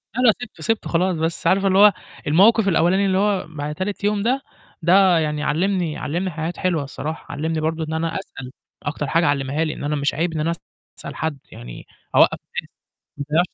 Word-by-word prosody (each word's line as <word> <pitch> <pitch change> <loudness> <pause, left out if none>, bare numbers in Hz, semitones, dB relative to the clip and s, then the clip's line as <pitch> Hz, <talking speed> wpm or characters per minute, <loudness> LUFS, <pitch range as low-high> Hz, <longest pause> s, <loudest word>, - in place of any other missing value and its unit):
لأ، 250 - 0
لأ، 240 -3 +7
سِبته، 245 - -9
سِبته 225 0 -1
خلاص، 180 +1 +1
بس 160 +1 -2
عارفة 195 +1 +3
اللي 190 0 +3
هو 205 -1 +8 0.3
الموقِف 200 +8 +5
الأولاني 190 +2 +3
اللي 190 -1 +2
هو 200 -3 +1
بعد 150 -1 -5
تالت 200 +3 -4
يوم 205 0 +1
ده، 255 +4 +1 0.4
ده 180 +1 +5
يعني 150 -1 -1
علّمني 175 -1 0
علّمني 180 +5 -2
حاجات 165 +2 -4
حلوة 175 -5 0
الصراحة، 150 +3 -6
علّمني 160 +2 -2
برضه 160 +1 -1
إن 160 0 -4
أنا 165 +1 -2
أسأل، 135 -9 -10 0.3
أكتر 145 0 -3
حاجة 165 +5 +2
علّمها 145 +2 0
لي 155 -1 -2
إن - - -8
أنا 150 +1 -1
مش 140 0 0
عيب 165 +3 -1
إن 160 - -3
أنا 160 +2 0 0.5
أسأل - - -7
حد، 160 -2 -2
يعني - - -10 0.3
أوقف - - +5 0.2
ناس - - -20 0.5
ما 145 - -4
أضيّعش 175 - +3
165 Hz, 205 wpm, -21 LUFS, 150-190 Hz, 0.5 s, هو